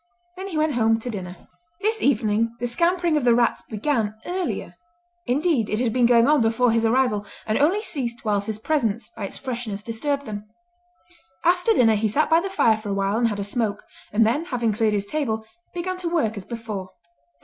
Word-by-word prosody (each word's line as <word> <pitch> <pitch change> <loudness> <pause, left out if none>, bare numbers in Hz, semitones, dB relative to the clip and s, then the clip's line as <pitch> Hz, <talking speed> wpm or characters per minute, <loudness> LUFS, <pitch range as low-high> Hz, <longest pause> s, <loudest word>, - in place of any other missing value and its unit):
Then 380 +1 -6
he 345 -5 -4
went 310 -1 +2
home 225 -2 +3
to 245 +2 -5
dinner. 180 -4 -8 0.3
This 440 +2 0
evening 225 -2 +1
the 245 - -2
scampering 340 +5 +1
of 295 - 0
the 240 -1 +5
rats 240 0 +2
began 220 -1 -1
earlier; 360 0 -3 0.5
indeed 265 -3 +1
it 215 - 0
had 240 -3 0
been 245 -2 +4
going 235 -1 +5
on 300 -2 +4
before 230 +2 +3
his 230 0 +2
arrival, 240 -3 +2 0.2
and 215 - 0
only 360 +9 +3
ceased 240 - -3
whilst 205 -1 0
his 215 -1 -1
presence 230 -3 -1
by 205 - -4
its - - -5
freshness 235 -6 -5
disturbed 280 +6 -2
them. 210 -1 -7 1.0
After 360 +5 +3
dinner 225 - +4
he 215 +1 +1
sat 295 +10 +1
by 325 - +6
the 390 +3 -3
fire 230 - +3
for 215 -1 -7
a 200 - -1
while 195 +2 0
and 235 - +3
had 205 -2 -3
a - - -1
smoke; 210 0 -2 0.3
and 220 +2 +4
then, 275 +9 +1
having 240 -8 0
cleared 215 0 +1
his 200 -1 -1
table, 220 -4 -2 0.3
began 365 +1 -3
to 360 -2 -3
work 300 -11 0
as 200 -3 -7
before. 220 -5 -6
235 Hz, 205 wpm, -23 LUFS, 215-300 Hz, 1.0 s, by